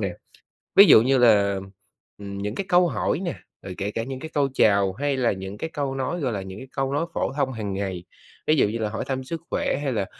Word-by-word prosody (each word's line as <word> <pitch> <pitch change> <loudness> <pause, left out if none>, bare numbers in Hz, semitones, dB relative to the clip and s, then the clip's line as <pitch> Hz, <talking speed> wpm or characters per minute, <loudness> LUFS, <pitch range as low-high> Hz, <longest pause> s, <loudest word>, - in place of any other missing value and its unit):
nè? - - -2 0.6
Ví 200 - +10
dụ 110 - +8
như 135 +3 +3
là, 100 -5 +4 0.6
ừm, 100 -1 -7
những 105 +2 -4
cái 195 - -3
câu 175 0 +5
hỏi 170 - -1
nè, 180 -3 -3 0.3
rồi 95 - -7
kể 100 +1 -2
cả 115 - -3
những 130 +2 -6
cái 160 - -7
câu 140 -2 +2
chào 100 -6 +3
hay 140 +5 -1
là 125 -3 +2
những 95 +1 -6
cái 160 - -4
câu 140 -2 -2
nói, 135 +6 -2
gọi 130 -5 -1
là, 100 - -3
những 95 +1 -8
cái 130 - -10
câu 135 0 -2
nói 145 +4 0
phổ - - -1
thông 135 -2 0
hàng 105 -4 -4
ngày, 95 -3 -4 0.4
ví 155 - +4
dụ 135 - +3
như 110 - -3
là 110 -1 -1
hỏi 110 - -4
thăm 130 -1 -3
sức 165 +5 -5
khỏe - - 0
hay 140 - 0
là, 105 -4 -1
120 Hz, 260 wpm, -24 LUFS, 100-140 Hz, 0.6 s, Ví